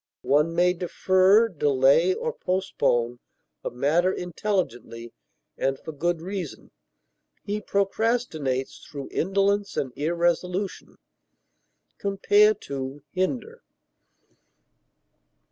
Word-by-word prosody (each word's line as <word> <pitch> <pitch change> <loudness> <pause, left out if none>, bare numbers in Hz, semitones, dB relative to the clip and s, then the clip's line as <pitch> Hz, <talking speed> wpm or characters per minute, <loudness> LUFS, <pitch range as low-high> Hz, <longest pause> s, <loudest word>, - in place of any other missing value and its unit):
One 150 +4 +2
may 180 +1 +4
defer, 185 +4 +3
delay, 145 +1 +3
or 475 -1 -3
postpone 125 -10 0 0.4
a - - -2
matter 155 +9 +2
intelligently 175 - -3 0.5
and 135 0 0
for 160 - -8
good 165 +2 -1
reason; 185 -5 -6 0.7
he 210 +1 -3
procrastinates 195 - -1
through 140 -2 -8
indolence 200 +2 0
and 130 -3 -2
irresolution. 175 +4 -1 1.0
Compare 205 +2 +4 0.6
HINDER. 250 - -2
180 Hz, 80 wpm, -25 LUFS, 145-200 Hz, 1.0 s, may